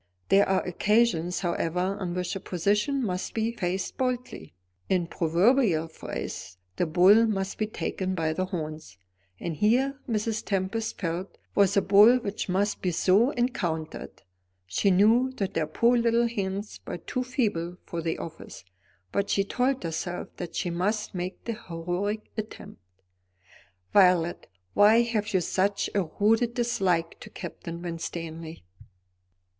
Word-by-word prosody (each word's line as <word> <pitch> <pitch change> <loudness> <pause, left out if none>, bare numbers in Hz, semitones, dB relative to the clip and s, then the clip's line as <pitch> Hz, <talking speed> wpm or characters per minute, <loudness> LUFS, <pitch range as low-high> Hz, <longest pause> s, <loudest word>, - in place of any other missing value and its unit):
There 200 0 +5
are 190 -1 +2
occasions, 180 -2 +1
however, 180 +1 -1
on 180 -3 -3
which 180 0 -2
a - - -3
position 210 - 0
must 180 -2 -3
be 225 0 0
faced 190 -4 -3
boldly 250 - -3 0.3
in 185 -2 +2
proverbial 175 +2 +2
phrase, 90 - -6 0.2
the 175 - +1
bull 195 +8 +6
must 195 -3 -2
be 215 - 0
taken 190 -3 -3
by 160 -2 0
the 185 +3 -1
horns. 155 - -6 0.4
And 165 -3 -4
here, 260 - +2
Mrs. 220 0 -1
Tempest 200 +3 -2
felt, 180 +1 -3 0.2
was 200 0 +3
a 200 - +4
bull 210 +5 +7
which 210 -5 -4
must 200 +3 0
be 185 - 0
so 190 +7 +3
encountered. 180 - -3 0.4
She 90 - +1
knew 225 +7 +4
that 195 -7 -3
her 155 -2 0
poor 235 +10 +3
little 235 0 +3
hands 200 -2 -4
were - - -4
too 255 +8 -3
feeble 205 -10 -1
for 170 - -4
the 165 0 -2
office; 160 - -9 0.5
but 200 0 -1
she 195 - +2
told 250 +5 0
herself 170 +2 -4
that 175 -2 -6
she 175 - -1
must 205 +5 -1
make 180 0 -5
the 230 - -2
heroic 180 +1 -3
attempt. 215 - -7 1.1
"Violet, 180 -4 +4 0.3
why 220 +3 +6
have 215 -3 -1
you 185 - +2
such 195 +4 0
a 195 -3 +1
rooted 225 +3 +3
dislike 190 -9 0
to - - -10
Captain 170 +1 -7
Winstanley?" 165 - -6
195 Hz, 145 wpm, -27 LUFS, 170-220 Hz, 1.1 s, bull